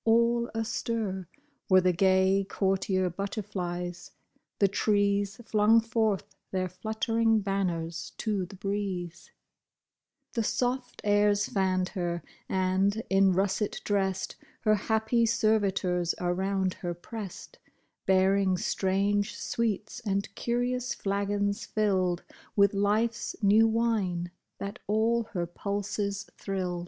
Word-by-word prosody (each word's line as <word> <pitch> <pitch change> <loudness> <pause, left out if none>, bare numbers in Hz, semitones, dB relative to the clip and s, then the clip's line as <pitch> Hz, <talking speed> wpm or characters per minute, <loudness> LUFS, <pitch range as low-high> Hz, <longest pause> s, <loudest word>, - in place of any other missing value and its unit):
All 235 +1 +3
astir 220 -4 -2 0.4
Were 185 -1 +7
the 180 0 +3
gay, 190 +2 +3
courtier 190 -1 +1
butterflies; 180 -2 -4 0.5
the 200 - +4
trees 205 +1 +1
Flung 215 +1 +5
forth 220 -3 0 0.3
their 185 -1 -1
fluttering 220 +3 +1
banners 175 -5 -2
to 205 -5 -1
the 195 - -11
breeze; 190 -3 -4 1.0
The 230 - 0
soft 245 +3 -1
airs 205 0 +3
fanned 185 -2 +1
her; 175 -4 -3 0.3
and, 190 +3 +1
in 195 -1 +5
russet 195 +2 0
dressed, 195 -2 -1 0.2
Her 215 - +4
happy 220 +3 +2
servitors 200 -6 +1
around 190 +1 0
her 175 -1 -3
pressed, 200 +2 -8 0.5
Bearing 190 0 +3
strange 200 +3 0
sweets, 215 -2 -2
and 200 -3 -2
curious 245 +2 -1
flagons 200 0 -1
filled 185 -4 +1 0.3
With 200 -1 +5
life's 210 +3 0
new 215 +3 +6
wine, 210 -7 0 0.3
that 200 0 -6
all 225 +2 +2
her 175 -3 -1
pulses 200 +2 -3
thrilled. 185 -3 -2
200 Hz, 105 wpm, -29 LUFS, 185-215 Hz, 1.0 s, Were